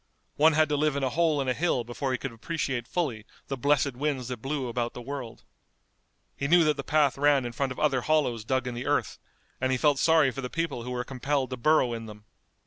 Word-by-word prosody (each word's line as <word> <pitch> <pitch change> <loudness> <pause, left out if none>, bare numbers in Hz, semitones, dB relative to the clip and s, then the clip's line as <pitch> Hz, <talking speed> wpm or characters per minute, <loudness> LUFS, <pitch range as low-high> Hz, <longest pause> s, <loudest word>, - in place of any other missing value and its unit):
One 155 +2 +5
had 155 +1 +4
to 150 - +1
live 150 0 +1
in 140 - -1
a 130 - 0
hole 160 0 +2
in 135 - -3
a 130 - +2
hill 135 -3 0
before 120 +3 -3
he 130 - 0
could 135 - -5
appreciate 125 0 -3
fully 135 -12 -2 0.3
the 135 - -1
blessed 140 +1 +2
winds 135 -2 -2
that 125 -3 -5
blew 135 0 -2
about 120 0 -3
the 125 - -6
world. 135 -3 -7 0.9
He 140 - -2
knew 170 +2 +6
that 150 -1 +2
the - - -5
path 145 -3 +2
ran 145 -3 +3
in 120 - -4
front 135 +3 -2
of 130 - -6
other 135 -4 +2
hollows 135 -7 +1
dug 130 +3 0
in 125 - -3
the 120 +1 -5
earth, - - 0 0.4
and 130 0 +1
he 130 - +2
felt 145 +1 +2
sorry 160 -4 +4
for 135 - -6
the 125 - -4
people 165 -6 -2
who 125 - -7
were 125 0 -2
compelled 135 +1 -2
to 130 - -3
burrow 130 -1 +3
in 115 -1 -6
them. 105 -1 -12
135 Hz, 245 wpm, -27 LUFS, 125-150 Hz, 0.9 s, knew